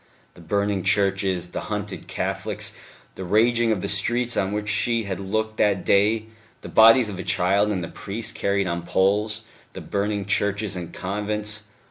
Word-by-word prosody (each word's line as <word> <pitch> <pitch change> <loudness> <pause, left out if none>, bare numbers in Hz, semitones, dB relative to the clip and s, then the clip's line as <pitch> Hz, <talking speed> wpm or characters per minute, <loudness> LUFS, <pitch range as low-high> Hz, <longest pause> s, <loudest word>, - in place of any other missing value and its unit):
The 90 - -15
burning 100 +3 0
churches, 95 -2 +1
the - - -4
hunted 105 -2 -5
Catholics, - - -3 0.4
the 95 - -7
raging 115 +4 +3
of 105 -4 0
the - - -2
streets 120 +4 +2
on 95 0 0
which 105 0 -3
she 115 +2 +1
had 100 -2 -4
looked 110 +3 -2
that 100 -3 +1
day, 105 +3 +3 0.4
the - - -9
bodies 115 +2 +7
of 100 -3 -6
the 95 - -5
child 95 +3 +2
and 95 -4 -2
the - - -4
priest 105 +5 -5
carried 100 0 0
on 85 -1 -2
poles, 105 +5 +1 0.3
the - - -7
burning 100 0 -2
churches 100 0 0
and 90 -2 -6
convents. 105 +2 -2
100 Hz, 170 wpm, -24 LUFS, 95-110 Hz, 0.4 s, bodies